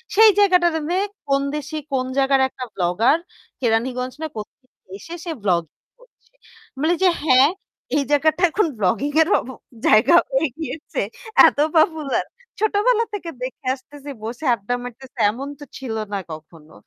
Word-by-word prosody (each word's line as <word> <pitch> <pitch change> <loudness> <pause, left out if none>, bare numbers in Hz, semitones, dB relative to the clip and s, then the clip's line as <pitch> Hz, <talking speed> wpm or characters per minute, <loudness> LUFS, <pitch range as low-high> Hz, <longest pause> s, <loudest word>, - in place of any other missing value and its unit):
সেই 440 +1 +8
জায়গাটাতে 350 -3 +3 0.3
কোন 275 0 +3
দেশি 300 +1 -5 0.2
কোন 255 -2 0
জায়গার 270 0 +3
একটা 255 - -8
ব্লগার। 195 - +2 0.4
কেরানীগঞ্জ 250 +2 0
না 315 - -2
কোথেকে 220 +5 -9 0.3
এসে, 330 - -10
সে 340 - -3
ব্লগিং 170 -5 0 0.2
করছে। - - -26 0.5
বলি 315 +4 +2
যে 370 - +6
"হ্যাঁ? 270 -1 +5 0.5
এই 280 - +2
জায়গাটা 310 +4 +2
এখন 400 -2 +2
ব্লগিং 215 +8 +1
এরও 320 +5 +4
ব - - -8 0.4
জায়গা 215 +10 +6 0.2
হয়ে 270 +4 +2
গিয়েছে! 315 -1 -5 0.5
এত - - -1 0.2
পপুলার! 310 -3 +1 0.3
ছোটবেলা 435 +2 +2
থেকে 360 -5 -5
দেখে 255 +1 -6
আসতেছি, 285 +2 -13
বসে 240 +7 -6
আড্ডা 225 +1 -3
মারতেছি। 255 +2 -11
এমন 265 +5 -7
তো 290 - -9
ছিল 245 -4 -5 0.2
না - - 0
কখনো।" 155 0 -12
275 Hz, 145 wpm, -21 LUFS, 235-320 Hz, 0.5 s, সেই